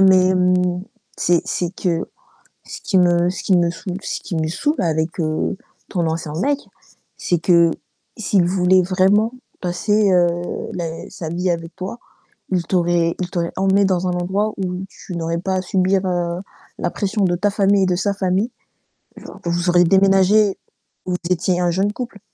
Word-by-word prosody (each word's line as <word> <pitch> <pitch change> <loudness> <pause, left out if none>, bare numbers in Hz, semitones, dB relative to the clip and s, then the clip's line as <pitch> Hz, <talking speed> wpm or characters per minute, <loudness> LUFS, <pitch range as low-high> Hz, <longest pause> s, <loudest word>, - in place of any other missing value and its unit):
Mais 185 -1 +5
mmh, 180 0 +2 0.3
c'est 175 -1 +2
c'est 175 -1 -2
que 170 -3 -1 0.6
ce - - -9
qui 190 - +1
me 175 -1 +3
ce 185 - -5
qui 190 - +3
me 170 -1 +3
saoule 180 +2 -5
ce - - -3
qui 175 - -5
me 160 -1 0
saoule 290 - -1
avec, 160 0 -1
heu, 155 -1 -1 0.3
ton 175 -4 -1
ancien 160 -1 -3
mec, 285 +1 +1 0.6
c'est 175 - 0
que 170 0 +4 0.5
s'il 200 -4 +2
voulait 185 0 +3
vraiment 195 +5 +2 0.3
passer, 200 +3 +1
heu, 175 -1 +4 0.5
la 165 -2 -5
sa 160 -2 -6
vie 180 +2 -1
avec 165 0 -5
toi, 190 +5 -6 0.5
il 180 -2 +1
t'aurait 170 -2 +1
il 180 - -2
t'aurait 170 -1 -2
emmenée 195 +1 +3
dans 185 -1 +1
un - - 0
endroit 195 +5 -1
où 185 -1 -3
tu 180 - -9
n'aurais 165 0 -2
pas 190 +2 -2
à 185 - 0
subir, 190 +1 +1
heu, 175 -1 -1 0.4
la - - 0
pression 205 0 -1
de 175 -1 +1
ta 200 +3 +1
famille 200 -1 +3
et - - +3
de 180 -1 +1
sa 200 +2 0
famille. 195 +4 0 0.6
Genre - - -11
vous 175 +1 0
auriez 175 0 +5
déménagé 195 +2 +4 0.5
vous 180 - -1
étiez 180 0 +1
un 175 -1 +2
jeune 195 +4 0
couple, 230 -4 -6
180 Hz, 175 wpm, -20 LUFS, 175-195 Hz, 0.6 s, Mais